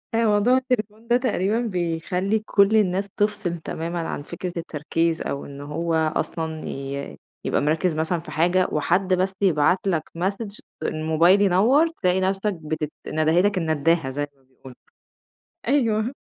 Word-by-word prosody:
أ 230 - +3
موضوع 215 +4 +4
التليفون 230 -3 -2
ده 240 +1 +4
تقريبًا 220 -3 0
بيخلّي 180 0 -1
كل 200 +2 +4
الناس 200 0 +1
تفصِل 205 -5 0
تمامًا 165 +1 -4
عن - - -4
فكرة 175 +2 -6
التركيز، 165 +1 -1
أو 140 - -4
إن 140 0 -9
هو 160 +3 -3 0.2
أصلًا 160 -1 -3
ي 140 +1 -5 0.3
يبقى - - +1
مركِّز 155 +3 +1
مثلًا 160 +2 0
في 165 - -10
حاجة 175 +3 +2
وحد 180 +5 +1
بس 185 +1 +1
يبعت 185 +1 +3
لك 165 -5 +1
message 200 +3 -3 0.2
الموبايل 160 +5 +3
ينوَّر 220 - +4
تلاقي 185 0 +2
نَفسَك 195 +2 0
بتت 155 -2 -4 0.2
ندهِتَك 175 +6 +2
الندّاهة 160 -2 +1
زي 145 +2 -3
ما 135 - -30
بيقولوا، 130 0 -15 0.9
أيوه، 235 -3 +2
180 Hz, 145 wpm, -23 LUFS, 160-205 Hz, 0.9 s, موضوع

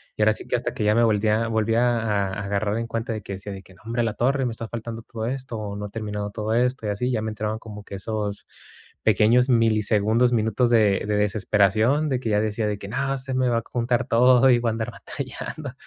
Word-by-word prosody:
y 105 - +1
ahora 110 0 +5
sí - - -7
que, - - 0
hasta - - -2
que - - -3
ya 105 +1 +3
me 120 - +4
volvía 110 0 +2
a - - -2
volvía 115 +2 +2
a 105 -3 0
a 95 - -6
a 100 - -4
agarrar 100 +2 -1
en 115 - -3
cuenta 115 0 -3
de 110 - -5
que 100 - -7
decía, 100 +2 -6
de 95 - -8
que: 95 0 -18
"Nombre, 115 +5 -3
la 115 -2 0
torre 135 +2 +1
me - - -2
está 115 0 -6
faltando 115 0 -6
todo 115 -1 -5
esto, 130 -1 -4
o 100 -1 -5
no 105 0 -5
he - - -12
terminado 105 -2 -4
todo 110 +1 -3
esto", 125 -2 0
y - - -1
así, 125 +5 -1
ya 110 -3 0
me 110 - -3
entraban 110 0 -3
como 105 -2 -10
que - - -12
esos 105 0 -4 0.6
pequeños 115 +5 +4
milisegundos, 110 +1 +3
minutos 115 +2 +1
de 105 -4 +3
de 105 - 0
desesperación, 110 +7 +2
de 130 -2 0
que 115 - -3
ya 105 -1 +2
decía 110 +1 -1
de 105 -1 -2
que: 100 - -8
"No, 135 +5 -1
se 130 0 -4
me 130 -1 +2
va 115 - +2
a - - -10
juntar 120 0 -1
todo 125 +2 +5
y 120 - +6
voy 120 -1 0
a - - 0
andar 110 0 -3
batallando", 140 -4 -7
110 Hz, 255 wpm, -24 LUFS, 105-120 Hz, 0.6 s, y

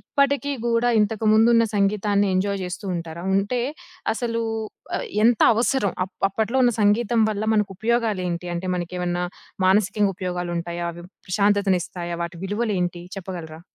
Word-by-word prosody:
ఇప్పటికి 280 0 +1
గూడా 235 +1 +2
ఇంతకు 215 +1 0
ముందున్న 230 +1 +5
సంగీతాన్ని 200 0 +2
ఎంజాయ్ 200 +1 0
చేస్తూ 180 +3 -6
ఉంటారా? 170 +1 -6
ఉంటే, 205 +5 0 0.5
అసలు 230 -1 -2 0.8
ఎంత 235 -1 +4
అవసరం? 230 -2 +1
అప్ 190 - -15
అప్పట్లో 220 +5 -1
ఉన్న 240 - +4
సంగీతం 225 +3 +3
వల్ల 210 0 -3
మనకు 210 -2 +1
ఉపయోగాలేంటి? 205 -7 0
అంటే 185 +2 -3
మనకేమన్నా 180 0 -2 0.4
మానసికంగా 200 +1 +3
ఉపయోగాలుంటాయా? 175 -1 -3
అవి 175 +1 -11 0.2
ప్రశాంతతను 200 0 +2
ఇస్తాయా? 175 -1 -5
వాటి 170 0 -5
విలువలేంటి 195 -4 -1 0.2
చెప్పగలరా? 170 -4 -7
200 Hz, 125 wpm, -23 LUFS, 180-225 Hz, 0.8 s, ముందున్న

